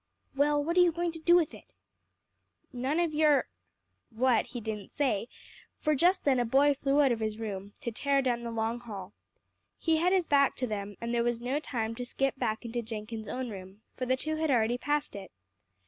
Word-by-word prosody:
"Well, 290 Hz, +1 st, +2 dB
what 335 Hz, +4 st, -1 dB
are -, -, +8 dB
you 350 Hz, -1 st, +5 dB
going 340 Hz, +1 st, -1 dB
to 325 Hz, -, -9 dB
do 345 Hz, +2 st, +5 dB
with 340 Hz, -3 st, +2 dB
it?" -, -, -14 dB, 1.0 s
"None 260 Hz, +6 st, -1 dB
of 340 Hz, -3 st, +1 dB
your 300 Hz, -2 st, +4 dB, 0.4 s
" -, -, -52 dB, 0.2 s
what, 245 Hz, +1 st, +2 dB
he 245 Hz, -, -6 dB
didn't 215 Hz, -3 st, -5 dB
say, 245 Hz, -7 st, 0 dB, 0.5 s
for 305 Hz, -, +1 dB
just 355 Hz, +6 st, +3 dB
then 265 Hz, -3 st, +3 dB
a -, -, +3 dB
boy 275 Hz, +5 st, +4 dB
flew 275 Hz, +1 st, +2 dB
out 270 Hz, -, +4 dB
of 235 Hz, -, 0 dB
his 215 Hz, -1 st, -2 dB
room, 200 Hz, -3 st, -5 dB
to 235 Hz, -, -3 dB
tear 275 Hz, +4 st, +1 dB
down 240 Hz, -2 st, 0 dB
the 235 Hz, -, -5 dB
long 230 Hz, +1 st, -2 dB
hall. 205 Hz, -5 st, -8 dB, 0.6 s
He 325 Hz, -1 st, +2 dB
had 350 Hz, +3 st, +2 dB
his 375 Hz, -2 st, +3 dB
back 280 Hz, -3 st, +3 dB
to 255 Hz, -, -2 dB
them, 205 Hz, -3 st, -4 dB
and 235 Hz, 0 st, -3 dB
there 235 Hz, 0 st, +2 dB
was 240 Hz, -1 st, 0 dB
no 255 Hz, +4 st, -1 dB
time 230 Hz, -7 st, -3 dB
to 245 Hz, -, -5 dB
skip 270 Hz, +2 st, 0 dB
back 220 Hz, -1 st, -1 dB
into 235 Hz, +1 st, -2 dB
Jenkins' 220 Hz, -1 st, -6 dB
own 250 Hz, 0 st, -4 dB
room, 190 Hz, +2 st, -10 dB
for 255 Hz, -, -3 dB
the 260 Hz, +1 st, +2 dB
two 310 Hz, +3 st, -3 dB
had 315 Hz, 0 st, 0 dB
already 240 Hz, -1 st, +2 dB
passed 295 Hz, -3 st, -1 dB
it. 195 Hz, -2 st, -8 dB
250 Hz, 220 wpm, -30 LUFS, 225-295 Hz, 1.0 s, are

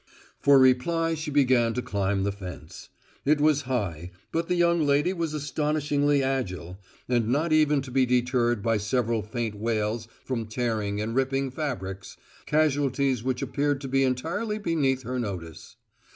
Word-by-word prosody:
For 140 Hz, -1 st, +6 dB
reply 165 Hz, +6 st, +3 dB
she 155 Hz, -1 st, -4 dB
began 130 Hz, -5 st, +3 dB
to 125 Hz, -, -1 dB
climb 100 Hz, -3 st, -1 dB
the 100 Hz, -, 0 dB
fence. 95 Hz, -3 st, -9 dB, 0.3 s
It 150 Hz, +1 st, +3 dB
was 150 Hz, -1 st, +3 dB
high, 90 Hz, -9 st, -2 dB, 0.2 s
but 165 Hz, 0 st, -1 dB
the 180 Hz, -, +1 dB
young 170 Hz, -1 st, +3 dB
lady 145 Hz, +5 st, +2 dB
was 165 Hz, -4 st, -3 dB
astonishingly 145 Hz, -1 st, 0 dB
agile, 95 Hz, -9 st, -3 dB, 0.3 s
and 120 Hz, -3 st, +1 dB
not 150 Hz, +7 st, +1 dB
even 150 Hz, -3 st, +3 dB
to 130 Hz, -, -9 dB
be 130 Hz, 0 st, +2 dB
deterred 120 Hz, -3 st, +1 dB
by 115 Hz, -1 st, +2 dB
several 115 Hz, +2 st, 0 dB
faint 110 Hz, 0 st, -3 dB
wails 110 Hz, +1 st, -2 dB, 0.2 s
from 115 Hz, -4 st, -3 dB
tearing 110 Hz, -3 st, -2 dB
and 110 Hz, +2 st, -2 dB
ripping 135 Hz, +1 st, 0 dB
fabrics 100 Hz, -, -5 dB, 0.3 s
casualties 140 Hz, -4 st, +1 dB
which 130 Hz, 0 st, -2 dB
appeared 145 Hz, -1 st, 0 dB
to 135 Hz, -, -5 dB
be 135 Hz, +1 st, +2 dB
entirely 165 Hz, -, -1 dB
beneath 145 Hz, -9 st, 0 dB
her 125 Hz, +2 st, -3 dB
notice. 90 Hz, -8 st, -6 dB
130 Hz, 155 wpm, -26 LUFS, 110-145 Hz, 0.3 s, For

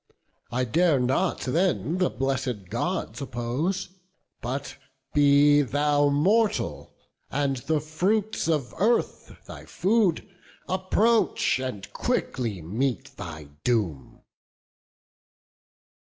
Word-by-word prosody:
I 125 Hz, +1 st, 0 dB
dare 160 Hz, +4 st, +3 dB
not 125 Hz, +1 st, 0 dB
then 170 Hz, +3 st, 0 dB
the 180 Hz, -, +3 dB
blessed 125 Hz, -5 st, -3 dB
Gods 115 Hz, -, -2 dB
oppose; 135 Hz, +10 st, -2 dB, 0.5 s
But 130 Hz, +4 st, -4 dB, 0.4 s
be 145 Hz, 0 st, +5 dB
thou 145 Hz, +1 st, +2 dB
mortal, 200 Hz, +10 st, +1 dB, 0.3 s
and 140 Hz, -1 st, 0 dB
the 155 Hz, +5 st, 0 dB
fruits 190 Hz, +8 st, -1 dB
of 150 Hz, -6 st, 0 dB
earth 230 Hz, +4 st, 0 dB
Thy -, -, -10 dB
food, 200 Hz, -4 st, +1 dB, 0.4 s
approach, 190 Hz, -, +2 dB
and 115 Hz, -7 st, -5 dB
quickly 110 Hz, -9 st, -2 dB
meet 115 Hz, -, -2 dB
thy 80 Hz, -7 st, -8 dB
doom." 100 Hz, -, -1 dB
140 Hz, 95 wpm, -26 LUFS, 120-175 Hz, 0.5 s, be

